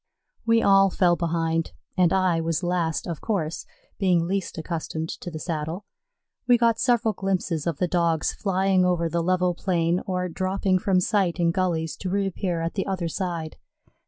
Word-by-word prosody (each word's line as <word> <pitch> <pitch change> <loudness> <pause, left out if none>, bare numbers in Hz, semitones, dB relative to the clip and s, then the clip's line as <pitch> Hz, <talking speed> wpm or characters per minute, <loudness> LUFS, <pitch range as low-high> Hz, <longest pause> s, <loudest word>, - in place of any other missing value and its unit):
We 230 0 +4
all 195 0 +6
fell 175 -2 +3
behind, 165 -1 -1 0.2
and 180 -2 +3
I 185 -3 +2
was 165 +1 -1
last, 175 -2 0
of 170 -3 -5
course, 170 -8 -2 0.3
being 180 -4 +3
least 190 +1 -2
accustomed 160 0 -4
to - - -6
the 160 - -6
saddle. 160 +4 -4 0.6
We 245 -1 +6
got 230 -1 +2
several 240 -3 +2
glimpses 185 -5 -2
of 165 -4 -1
the 180 - 0
Dogs 170 -2 +1
flying 190 -1 +1
over 175 -2 +1
the 170 +1 -1
level 180 +1 +1
plain 170 -1 0
or 180 -1 -1
dropping 185 +1 0
from 185 -1 +2
sight 190 -3 +1
in 170 -1 +3
gullies 170 -3 -1
to 185 - -4
reappear 190 -3 -1
at 165 0 -2
the 195 - -2
other 185 -3 -2
side. 170 -2 -4
180 Hz, 170 wpm, -25 LUFS, 165-190 Hz, 0.6 s, all